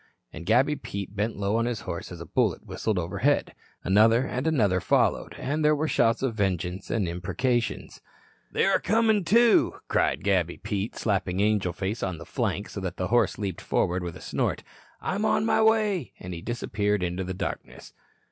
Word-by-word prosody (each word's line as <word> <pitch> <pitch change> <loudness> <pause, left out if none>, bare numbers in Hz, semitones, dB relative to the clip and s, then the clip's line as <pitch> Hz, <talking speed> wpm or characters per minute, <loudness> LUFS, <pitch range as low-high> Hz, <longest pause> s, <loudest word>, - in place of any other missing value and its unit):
And 85 +1 -9
Gabby 130 +7 +4
Pete 100 -7 -6
bent 105 +3 -1
low 100 +2 0
on 115 +1 +1
his 120 -3 -3
horse - - -6
as - - -8
a - - -7
bullet - - 0
whistled 110 -3 -2
overhead. 85 -1 0 0.3
Another 115 +6 +4
and 130 +3 -2
another 105 - +2
followed, - - +1
and 150 +4 -2
there 150 0 +4
were 155 +2 -1
shouts 115 -4 +2
of 130 -3 0
vengeance, 95 -2 -2
and 105 -6 0
imprecations. 105 +8 -2 0.5
"They're - - +2
a - - -12
comin' 220 -1 +2
to," 230 +5 +4
cried - - +1
Gabby 95 -4 +1
Pete, 100 +2 -3
slapping 95 -3 -1
Angel 105 -3 +2
Face 95 +6 -3
on 95 -3 -2
the 85 - -10
flank, 100 - -2
so - - -6
that 95 -2 -4
the 90 0 -2
horse 120 +1 +2
leaped 100 -5 -4
forward 90 +1 0
with 85 -2 -5
a - - -14
snort. - - -2 0.4
"I'm 200 +3 -2
on 215 - +2
my 220 - +3
way." 215 - +2
And 90 0 -7
he 85 - -6
disappeared 105 -3 -1
into 90 +1 -2
the 95 0 -4
darkness. - - -6
105 Hz, 185 wpm, -26 LUFS, 95-130 Hz, 0.5 s, Gabby